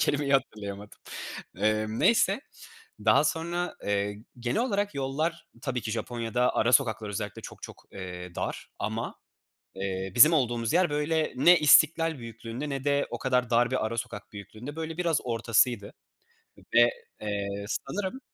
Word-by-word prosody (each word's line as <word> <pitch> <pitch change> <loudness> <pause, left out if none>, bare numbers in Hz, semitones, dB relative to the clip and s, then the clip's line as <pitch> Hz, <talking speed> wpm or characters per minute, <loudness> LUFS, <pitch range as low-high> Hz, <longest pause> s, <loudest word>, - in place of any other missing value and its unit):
kelimeyi 145 -1 +1
hatırlayamadım. 105 -6 -2 0.6
Emm, 110 +1 0
neyse 225 0 +4 0.6
daha - - +5
sonra, 175 +2 -2
eee, 100 +2 -1 0.2
genel 125 - 0
olarak 205 -4 -1
yollar 155 +5 -2 0.2
tabii 125 -3 -2
ki 110 - -4
Japonya’da 115 +2 -1
ara 120 +2 +2
sokaklar 110 -5 +3
özellikle 105 0 -5
çok - - -10
çok, - - -10
eee, 90 -2 -7
dar - - -4
ama, 110 +3 -3 0.6
eee, 95 -1 -3
bizim 150 +7 +9
olduğumuz 120 -4 +1
yer 175 -2 +4
böyle 155 +2 0
ne 170 +7 +6
İstiklal 155 +1 +5
büyüklüğünde 115 +4 -6
ne 135 -1 -3
de 140 0 +1
o - - -4
kadar 125 -2 +1
dar 120 +1 +3
bir 130 -4 0
ara 115 +1 -3
sokak 105 -2 -6
büyüklüğünde, 110 +8 -9
böyle, 160 0 -5
biraz 170 -4 +1
ortasıydı 115 -2 +1 0.8
ve, 120 0 +7 0.3
eee, 100 -1 -2 0.2
sanırım, 205 - -3
120 Hz, 145 wpm, -28 LUFS, 110-155 Hz, 0.8 s, bizim